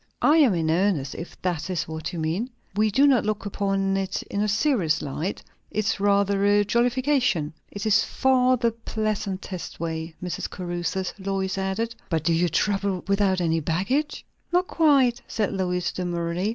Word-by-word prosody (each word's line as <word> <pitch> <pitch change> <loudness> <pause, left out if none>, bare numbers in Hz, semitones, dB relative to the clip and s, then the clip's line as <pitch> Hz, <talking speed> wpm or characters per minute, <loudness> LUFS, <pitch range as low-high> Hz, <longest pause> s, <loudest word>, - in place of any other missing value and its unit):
"I 305 +2 +6
am 265 - +5
in 160 -1 +1
earnest, 170 -5 +1
if 170 - -8
that 180 -1 -1
is 175 -4 -2
what 160 +1 -5
you 175 - -6
mean. 165 +10 -1 0.3
We 215 +1 +3
do 270 +8 +4
not 265 -5 +4
look 215 0 -2
upon 195 -1 0
it 195 0 -2
in 200 - -3
a 210 - +1
serious 210 - +2
light. 155 +6 -4 0.3
It's 210 -1 -1
rather 200 0 +2
a 205 0 +4
jollification." 240 - +1 0.2
"It 200 +1 -5
is 210 -1 +4
far 255 -1 +3
the 235 -1 +1
pleasantest 205 -5 -4
way, 160 0 -4
Mrs. 180 -3 -3
Caruthers," 175 +1 -3
Lois 195 0 -2
added. 195 +4 -2 0.2
"But 160 -3 0
do 170 +1 +2
you 170 +1 +2
travel 195 +2 0
without 200 -1 +2
any 165 -1 +1
baggage?" 195 - -1 0.3
"Not 355 +1 +3
quite," 275 -6 +3
said 215 -3 -1
Lois 180 -2 -1
demurely. 175 +1 -2
195 Hz, 165 wpm, -25 LUFS, 175-220 Hz, 0.3 s, I